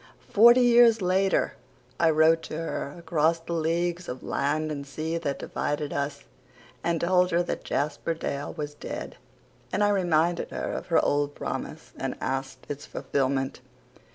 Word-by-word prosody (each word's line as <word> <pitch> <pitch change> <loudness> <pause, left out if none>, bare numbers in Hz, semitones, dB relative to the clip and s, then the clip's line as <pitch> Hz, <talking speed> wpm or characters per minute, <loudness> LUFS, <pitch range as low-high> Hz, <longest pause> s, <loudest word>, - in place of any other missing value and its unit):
Forty 235 +4 +8
years 240 -2 +6
later 190 +1 +1 0.4
I 165 - +5
wrote 160 +1 +4
to 155 - -4
her, 160 -3 -4
across 165 -1 +1
the 165 +1 -6
leagues 170 +2 -1
of 125 0 -6
land 155 +2 -1
and 140 -2 -4
sea 155 +4 -3
that 140 -4 -2
divided 145 0 -3
us, 140 0 -3 0.6
and 170 -1 +1
told 180 +1 +3
her 175 0 +2
that - - -4
Jasper 150 +3 -1
Dale 140 -3 -4
was 150 -2 -5
dead; 145 - -7 0.5
and 205 - +1
I 205 - +4
reminded 175 -3 +1
her - - -4
of - - -5
her - - +3
old 145 0 +1
promise - - -6
and - - -3
asked 135 0 -4
its 145 0 -6
fulfilment. 135 -1 -1
160 Hz, 155 wpm, -27 LUFS, 145-175 Hz, 0.6 s, Forty